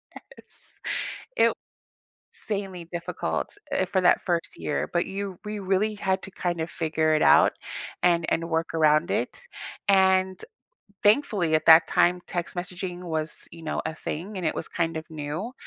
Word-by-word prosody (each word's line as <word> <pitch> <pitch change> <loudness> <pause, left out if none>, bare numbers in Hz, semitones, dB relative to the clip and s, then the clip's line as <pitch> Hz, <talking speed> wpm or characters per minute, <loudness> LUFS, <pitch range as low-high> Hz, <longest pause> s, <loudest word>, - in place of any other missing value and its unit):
Yes. - - -14 0.8
It - - +4 0.8
sanely 195 -5 -5
difficult, 170 -1 -3 0.2
eh, 185 - +2
for 190 +1 +1
that 180 - +4
first 170 -2 -1
year, 150 - -2
but 175 0 +1
you 195 -1 -5
we 210 0 -4
really 195 +3 +1
had 190 -2 -1
to - - -9
kinda 175 -3 -2
figure 160 -1 0
it 155 - +2
out, - - +6 0.5
and 170 -2 +3
and 165 +1 -1
work 165 0 -1
around 155 -1 +3
it. - - -1 0.5
And, 190 -1 +4 0.6
thankfully, 205 - +3
at 155 - +1
that 160 +1 +9
time, 180 +1 +3
text 175 0 -4
messaging 180 0 -5
was, 160 -3 -4
you 165 - -11
know, 155 - -2
a 160 - -3
thing, 180 +6 -5
and 180 -3 -2
it - - 0
was - - -4
kind 165 -1 -1
of 160 0 -6
new. 155 +9 -4
175 Hz, 160 wpm, -26 LUFS, 160-190 Hz, 0.8 s, that